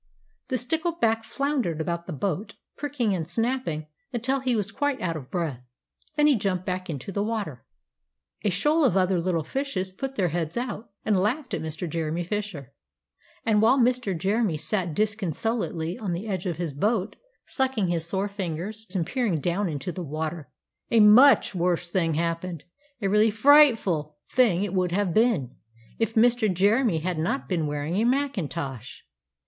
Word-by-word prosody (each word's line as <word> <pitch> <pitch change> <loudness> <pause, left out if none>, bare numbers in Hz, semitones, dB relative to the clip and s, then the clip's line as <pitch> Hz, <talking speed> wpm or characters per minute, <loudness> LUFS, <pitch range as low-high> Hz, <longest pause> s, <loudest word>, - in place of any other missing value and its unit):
The 260 - -1
stickleback 250 -4 0
floundered 260 - -1
about 170 +1 -3
the - - -5
boat, 185 - -3 0.2
pricking 270 -8 -1
and 165 -4 -2
snapping 230 -8 -1 0.3
until 260 +3 0
he 255 -2 0
was 210 -1 -1
quite 285 +1 -1
out 165 -2 -2
of 140 -5 -7
breath. 155 -9 -3 0.5
Then 300 -1 +3
he 300 - +6
jumped 190 -4 -1
back 185 0 -3
into 145 +4 -5
the 200 - -1
water. 210 - -3 0.8
And 205 - +2
a - - -2
shoal 300 - +2
of 220 -9 +3
other 185 -1 +2
little 170 -2 0
fishes 190 - -3
put 270 +8 -5
their 185 -4 +1
heads 165 +3 -2
out, 240 -2 -4 0.2
and 215 - +3
laughed 250 +8 -1
at - - -1
Mr. 160 +2 -4
Jeremy 165 +1 -2
Fisher. 180 - -5 0.7
And 215 -3 +3
while 230 +5 +5
Mr. 245 -7 +2
Jeremy 195 -1 +1
sat 175 0 -1
disconsolately 205 - -1
on 200 -6 -2
the 185 +6 -4
edge 190 -2 -2
of 170 -3 -2
his 170 -4 -3
boat 205 - 0 0.3
sucking 260 -8 0
his 170 -2 0
sore 190 +4 -2
fingers 200 +3 -5
and 175 -3 +1
peering 230 - 0
down 180 +5 0
into 145 +3 -4
the 180 - -6
water 155 0 -4 0.4
a 230 - +4
much 225 +7 +7
worse 175 -1 0
thing 165 -4 +1
happened; 170 0 -2 0.4
a - - +2
really 210 +3 +4
frightful 220 - +4
thing 215 -8 +3
it 200 -2 -3
would 180 -2 +1
have 195 -3 +1
been, 215 - +2 0.4
if 225 0 0
Mr. 230 -2 +4
Jeremy 200 0 +2
had 175 -1 -2
not 175 +12 -1
been 165 -5 0
wearing 150 +4 -2
a 215 - +2
macintosh! 170 - -2
195 Hz, 170 wpm, -26 LUFS, 170-230 Hz, 0.8 s, much